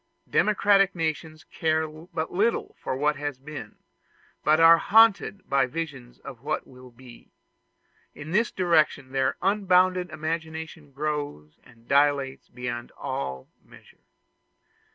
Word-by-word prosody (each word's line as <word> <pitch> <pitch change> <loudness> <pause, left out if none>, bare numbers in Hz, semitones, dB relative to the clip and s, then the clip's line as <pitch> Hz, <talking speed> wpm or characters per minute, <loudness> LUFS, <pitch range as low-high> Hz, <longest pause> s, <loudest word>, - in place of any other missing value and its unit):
Democratic 200 -2 +3
nations 160 -1 -3
care 160 0 -1
but 160 +1 -6
little 215 +6 0
for 130 - -3
what 150 +1 +1
has 145 -2 -4
been, 135 -5 -9 0.7
but 155 +1 +4
they 165 - +3
are 165 0 +8
haunted 220 -2 +3
by 135 -1 +2
visions 140 -5 -6
of 120 -4 -10
what 155 +3 -3
will 125 0 -15
be; 120 0 -16 0.9
in 150 +2 -9
this 215 +5 +2
direction 155 -7 +1
their 135 -1 0
unbounded 185 -2 +2
imagination 160 -1 -5
grows 145 - -4
and 115 -1 -21
dilates 140 -1 +1
beyond 120 -1 -6
all 65 -1 -5 0.2
measure. - - -19
155 Hz, 125 wpm, -26 LUFS, 130-165 Hz, 0.9 s, are